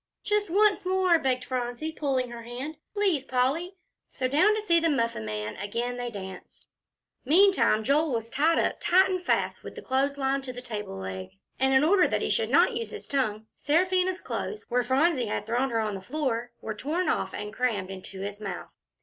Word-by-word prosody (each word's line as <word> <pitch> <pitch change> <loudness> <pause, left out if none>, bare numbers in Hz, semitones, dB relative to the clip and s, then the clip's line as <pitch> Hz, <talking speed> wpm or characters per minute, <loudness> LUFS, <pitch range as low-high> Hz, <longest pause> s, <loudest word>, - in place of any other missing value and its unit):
"Just 415 -1 0
once 410 +3 +3
more," 370 -2 +3
begged 255 -3 0
Phronsie, 250 +4 -3
pulling 265 -5 -1
her 235 -1 -7
hand; 255 +6 -6 0.2
"please, 385 -9 +2
Polly." 275 +9 0 0.3
So 255 - -2
down 360 +11 +4
to 435 - -2
see 340 -5 +4
the 330 0 +2
Muffin 230 - 0
Man 105 0 -4
again 235 +5 -3
they 245 0 -3
danced. 190 -4 -9 0.6
Meantime, 330 - +4
Joel 295 +5 +2
was 230 -2 -2
tied 315 +6 +3
up - - +1
tight 380 +2 +4
and 365 -1 -2
fast - - 0
with - - -9
the - - -7
clothes 275 +2 0
line 275 0 0
to 260 -2 -7
the 245 - -7
table 210 - -5
leg, 95 -1 -6 0.3
and 265 0 +3
in 265 - +5
order 365 +4 +5
that - - -1
he - - 0
should - - +1
not 485 - +4
use 460 0 -3
his 435 - -8
tongue, 220 -6 -1
Seraphina's 370 +4 +1
clothes, 425 - -4
where 250 +1 +2
Phronsie 260 +1 +2
had 210 - -3
thrown 245 +4 0
her 230 -2 0
on 215 -1 -2
the 195 - -6
floor, 245 0 -2
were 220 - -4
torn 305 - -2
off - - 0
and 210 0 -6
crammed 215 -7 -1
into 190 0 -8
his 205 +1 -6
mouth. 195 -4 -6
265 Hz, 200 wpm, -27 LUFS, 225-335 Hz, 0.6 s, in